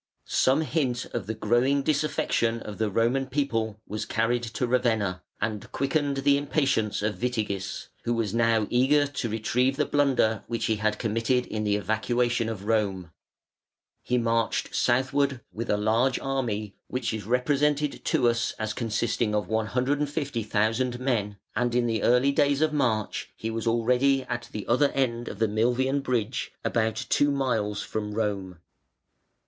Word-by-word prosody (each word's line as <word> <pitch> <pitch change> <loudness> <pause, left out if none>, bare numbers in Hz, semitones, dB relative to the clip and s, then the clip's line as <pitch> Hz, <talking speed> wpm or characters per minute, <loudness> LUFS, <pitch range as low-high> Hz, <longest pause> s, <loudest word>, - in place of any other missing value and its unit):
Some 135 +4 +3
hint 140 -6 -1
of 95 - -3
the 110 - -2
growing 120 +6 +2
disaffection 145 -6 +1
of 105 - -8
the 110 -1 +1
Roman 120 +6 +1
people 115 -7 -1
was 105 +1 -4
carried 115 +2 +1
to 120 +2 -2
Ravenna 110 -7 +1 0.2
and 110 0 -3
quickened 140 0 0
the 140 0 +5
impatience 140 -8 0
of 105 +1 -2
Witigis, 105 -6 -2
who 120 - 0
was 110 -3 -1
now 115 -2 +3
eager 135 +4 +4
to 135 -4 -3
retrieve 125 +5 +1
the - - +2
blunder 130 -7 +2
which 115 -1 -2
he 110 - +1
had 110 0 0
committed 115 +3 0
in 105 0 -3
the 105 0 +2
evacuation 115 +3 0
of 105 -3 -6
Rome. 100 -6 0 0.9
He 125 - 0
marched 115 -1 0
southward 135 +1 +1
with 115 +2 -5
a 105 - +2
large 115 +5 +2
army, 115 -7 -2
which 125 -3 -2
is 110 -2 -5
represented 145 +4 +1
to 145 -7 +2
us 115 -1 +1
as 110 -1 -2
consisting 115 -1 -1
of 105 -3 -1
150,000 125 -1 0
men, 110 -6 -1 0.2
and 120 -1 0
in 125 -1 +3
the 115 -2 0
early 125 +3 +4
days 140 0 +2
of 155 -1 +2
March 115 -8 0
he 115 - -4
was 115 +1 -3
already 125 +4 +3
at 120 -1 -5
the 105 - -5
other 140 +4 +3
end 120 -3 0
of - - -6
the 110 +1 +2
Milvian 125 +6 +1
Bridge, 125 -2 -2
about 110 -1 +1 0.2
two 145 - +4
miles 115 -7 0
from 105 -1 -4
Rome. 100 -5 -2
120 Hz, 155 wpm, -26 LUFS, 110-135 Hz, 0.9 s, the